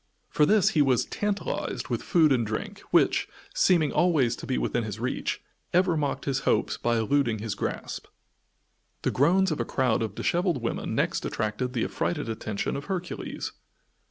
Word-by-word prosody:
For 150 - +4
this 210 -3 +5
he 155 - +2
was 130 -4 +3
"tantalized" 205 -4 -3
with 120 -2 -1
food 160 -4 +4
and 125 -3 +3
drink, 110 0 -4
which, - - +3 0.3
seeming 165 -6 +3
always 150 -10 +3
to - - -8
be 130 - 0
within 120 - 0
his 110 -1 -5
reach, 125 +2 -2 0.3
ever 180 -1 +3
mocked 145 -2 -1
his 135 -2 0
hopes - - +1
by 120 0 0
eluding 115 0 +1
his 105 0 -3
grasp. - - -4 1.0
The - - +1
groans 180 +7 +3
of 155 - -2
a - - +1
crowd 125 -4 +1
of 110 -3 -3
disheveled 175 -4 +1
women 115 - -2
next - - 0
attracted 110 +4 -2
the 115 - 0
affrighted 150 -8 -2
attention 110 -2 -3
of 140 - -5
Hercules. 180 -3 -4
135 Hz, 170 wpm, -27 LUFS, 115-170 Hz, 1.0 s, this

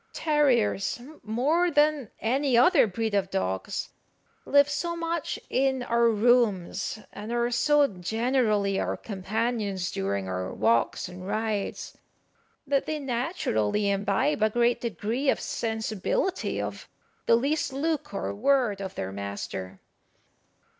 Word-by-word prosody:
Terriers, 255 -10 +1 0.2
more 280 +11 +1
than 295 -5 +2
any 260 +2 +1
other 245 0 +6
breed 220 +2 -2
of 195 -2 +1
dogs, 95 - -2 0.6
live 285 0 +5
so 340 +4 -2
much 335 -1 -2
in 265 -1 +1
our 235 -1 +3
rooms, 220 -5 +2 0.2
and 210 +3 -7
are 240 0 0
so 295 +4 +4
generally 215 0 0
our - - -1
companions 205 -1 -2
during 95 0 -2
our 95 0 -3
walks 115 +2 +1
and 180 +1 -9
rides, 215 -1 -2 0.7
that 280 -1 0
they 310 - -1
naturally 235 - 0
imbibe 200 +7 0
a 215 - +4
great 240 +2 +2
degree 235 +4 -1
of - - +2
sensibility 220 - -2
of - - -5 0.4
the - - +6
least 280 +5 0
look 300 0 -2
or 195 - -3
word 240 -2 +1
of 190 -1 -6
their 95 - -4
master. 100 -1 -6
225 Hz, 125 wpm, -27 LUFS, 195-270 Hz, 0.7 s, other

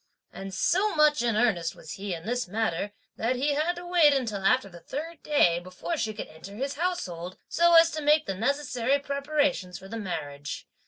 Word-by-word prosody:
And 195 0 -7
so 385 - +1
much 300 -3 +4
in 235 -2 +1
earnest 195 -8 +1
was 160 - -11
he 200 0 -5
in 165 +1 -10
this 245 0 -1
matter 205 -1 -1 0.3
that 235 +3 0
he 285 +4 +1
had 315 +5 0
to 350 +1 -8
wait 345 -5 +5
until 220 -7 -2
after 250 +2 +3
the 175 -3 -12
third 320 - -6
day 180 - +3
before 185 - -5
she 225 -8 -1
could 215 - -6
enter 185 +6 -11
his 275 +5 -2
household 185 - -3
(so 340 0 +4
as 330 0 +7
to 310 - -4
make 300 +1 +4
the 195 - -2
necessary 255 +3 0
preparations 280 -8 -1
for 190 - -12
the 230 +3 -6
marriage). 145 -7 -5
245 Hz, 200 wpm, -27 LUFS, 190-300 Hz, 0.3 s, as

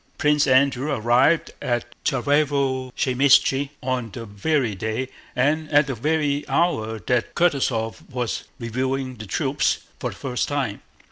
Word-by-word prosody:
Prince 150 0 +3
Andrew 135 +1 +3
arrived 130 +6 +3
at 120 -1 -1 0.2
Tsárevo 135 -1 +1
Zaymíshche 135 +1 +3
on 125 -3 -1
the 115 +2 -8
very 115 +3 0
day 110 +6 -3 0.3
and 150 +4 +1
at 145 0 +5
the 135 - -3
very 145 +3 0
hour 110 -11 +1
that 125 -2 0
Kutúzov 130 -9 0
was 125 -3 -3
reviewing 130 +1 -2
the 110 -1 -8
troops - - 0 0.2
for - - -2
the - - -9
first 125 -3 -2
time. 135 -8 -2
130 Hz, 135 wpm, -23 LUFS, 120-145 Hz, 0.3 s, at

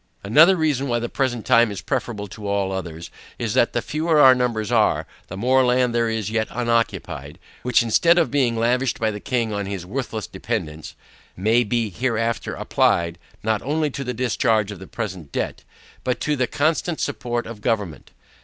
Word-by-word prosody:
Another 155 - +6
reason 150 -5 0
why 120 -2 +1
the 120 0 -3
present 120 -5 -1
time 115 0 +5
is 100 - -5
preferable 115 -5 -3
to 105 +1 -8
all 100 -1 0
others, 85 -3 -6 0.3
is, - - -2
that - - +3
the - - -1
fewer 155 +1 0
our 130 -3 +9
numbers 120 -4 -1
are, - - +2 0.2
the 95 - -7
more 130 +5 +3
land 125 -1 +2
there 115 -1 +1
is 110 -2 -2
yet 110 -1 0
unoccupied, 115 -1 -2 0.2
which 125 -1 +3
instead 165 +10 +4
of 170 - +2
being 125 -5 +1
lavished 120 +1 +1
by 110 -1 +1
the 105 - -6
king 115 -2 -1
on 100 -1 -3
his 95 -3 -5
worthless 115 0 -4
dependents, 90 -7 -5 0.4
may 110 +6 +3
be 115 -1 -1
hereafter 115 +2 -1
applied, 85 0 +1 0.2
not 110 -1 0
only 150 +2 -1
to 140 - -5
the 125 - -3
discharge 110 -3 +1
of 100 - -8
the 95 - -10
present 95 -10 -6
debt, - - -3 0.4
but 125 -1 -1
to 150 - 0
the 130 -3 0
constant 155 +5 0
support 120 -4 -2
of 115 -2 -9
government. 105 -8 -2
115 Hz, 185 wpm, -22 LUFS, 105-130 Hz, 0.4 s, our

